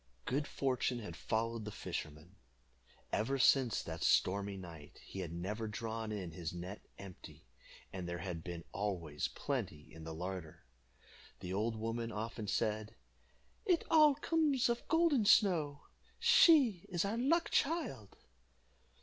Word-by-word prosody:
Good 140 Hz, +2 st, -1 dB
fortune 130 Hz, -2 st, 0 dB
had 105 Hz, -8 st, -7 dB
followed 115 Hz, +3 st, -2 dB
the 105 Hz, -, -5 dB
fisherman. 80 Hz, 0 st, -6 dB, 0.8 s
Ever 125 Hz, +6 st, +1 dB
since 130 Hz, -2 st, +4 dB
that -, -, -6 dB
stormy 100 Hz, +1 st, +2 dB
night 85 Hz, -5 st, -11 dB
he 95 Hz, -, -8 dB
had 90 Hz, -4 st, -4 dB
never 105 Hz, +6 st, -3 dB
drawn 110 Hz, +1 st, -4 dB
in 95 Hz, -5 st, -4 dB
his 85 Hz, 0 st, -5 dB
net 90 Hz, +4 st, -7 dB, 0.2 s
empty, 95 Hz, -9 st, -11 dB, 0.5 s
and 90 Hz, -2 st, -5 dB
there 85 Hz, -, -3 dB
had 85 Hz, -2 st, -5 dB
been 85 Hz, -2 st, -6 dB
always 90 Hz, -7 st, -2 dB
plenty 75 Hz, 0 st, -4 dB
in 80 Hz, 0 st, -10 dB
the 80 Hz, 0 st, -6 dB
larder. 90 Hz, -5 st, -6 dB, 0.8 s
The 90 Hz, 0 st, -4 dB
old 110 Hz, +3 st, 0 dB
woman 115 Hz, +1 st, -3 dB
often 110 Hz, 0 st, -4 dB
said, 110 Hz, 0 st, -1 dB, 0.7 s
"It 360 Hz, -6 st, +2 dB
all 305 Hz, -3 st, +7 dB
comes 295 Hz, -4 st, +2 dB
of 235 Hz, 0 st, -2 dB
Golden 325 Hz, -7 st, +3 dB
Snow 170 Hz, -9 st, +4 dB, 0.3 s
she 245 Hz, -, +5 dB
is 175 Hz, 0 st, 0 dB
our 200 Hz, +3 st, -1 dB
luck 330 Hz, +7 st, +2 dB
child." 265 Hz, -, -1 dB
110 Hz, 140 wpm, -35 LUFS, -, 0.8 s, all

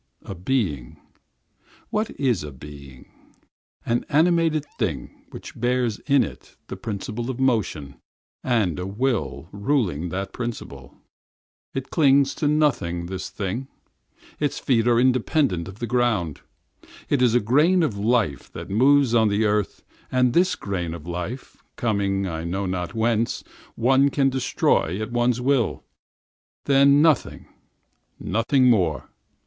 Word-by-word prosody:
A -, -, -7 dB
being? 90 Hz, -, -2 dB, 0.9 s
What 215 Hz, +1 st, 0 dB
is 125 Hz, -, +1 dB
a 75 Hz, -, -7 dB
being? 70 Hz, -1 st, -13 dB, 0.7 s
That 120 Hz, +1 st, 0 dB
animated 160 Hz, -1 st, +2 dB
thing, 80 Hz, -, -4 dB
that -, -, -9 dB
bears 120 Hz, -2 st, 0 dB
in 140 Hz, -3 st, +4 dB
it -, -, -10 dB
the -, -, -5 dB
principle 110 Hz, +2 st, -5 dB
of 130 Hz, -1 st, -4 dB
motion 110 Hz, -, -1 dB, 0.5 s
and 110 Hz, -, 0 dB
a 90 Hz, -, -4 dB
will 100 Hz, -, -2 dB
ruling 100 Hz, -, -1 dB
that 95 Hz, +5 st, -5 dB
motion. 120 Hz, -3 st, -4 dB, 1.0 s
It 135 Hz, -, -1 dB
is -, -, -27 dB
attached 140 Hz, -2 st, +3 dB
to 150 Hz, -, +1 dB
nothing, 140 Hz, -, +1 dB
this 95 Hz, +1 st, -5 dB
thing. 105 Hz, +6 st, -4 dB, 0.7 s
Its 145 Hz, -1 st, -1 dB
feet 115 Hz, -4 st, +1 dB
do 120 Hz, 0 st, +4 dB
not 130 Hz, -2 st, +3 dB
belong 95 Hz, -, 0 dB
to 95 Hz, -, -8 dB
the 105 Hz, +5 st, -6 dB
ground. 115 Hz, -, 0 dB, 0.7 s
It 140 Hz, -, +1 dB
is 120 Hz, -2 st, +4 dB
a -, -, +5 dB
grain 150 Hz, -, +3 dB
of 130 Hz, -10 st, -1 dB
life 100 Hz, -, 0 dB
that -, -, -8 dB
moves 135 Hz, +3 st, +4 dB
on 110 Hz, -2 st, +4 dB
the 105 Hz, +2 st, +1 dB
earth, 105 Hz, -1 st, -1 dB, 0.3 s
and 125 Hz, -1 st, +2 dB
this 180 Hz, +2 st, +3 dB
grain 90 Hz, -5 st, -4 dB
of 80 Hz, -2 st, -10 dB
life, 90 Hz, +9 st, -6 dB, 0.2 s
coming 100 Hz, -4 st, 0 dB
I 80 Hz, -3 st, -4 dB
know 95 Hz, +4 st, -2 dB
not 90 Hz, +2 st, -3 dB
whence, 115 Hz, 0 st, 0 dB, 0.3 s
one 135 Hz, +4 st, +3 dB
can 135 Hz, -1 st, +1 dB
destroy 115 Hz, -7 st, 0 dB
at 110 Hz, +2 st, -4 dB
one's 120 Hz, 0 st, +1 dB
will. 130 Hz, -2 st, +1 dB, 0.8 s
Then 140 Hz, +1 st, +5 dB
nothing—nothing 130 Hz, -4 st, -1 dB
more. 90 Hz, -, +2 dB
115 Hz, 140 wpm, -23 LUFS, 95-135 Hz, 1.0 s, a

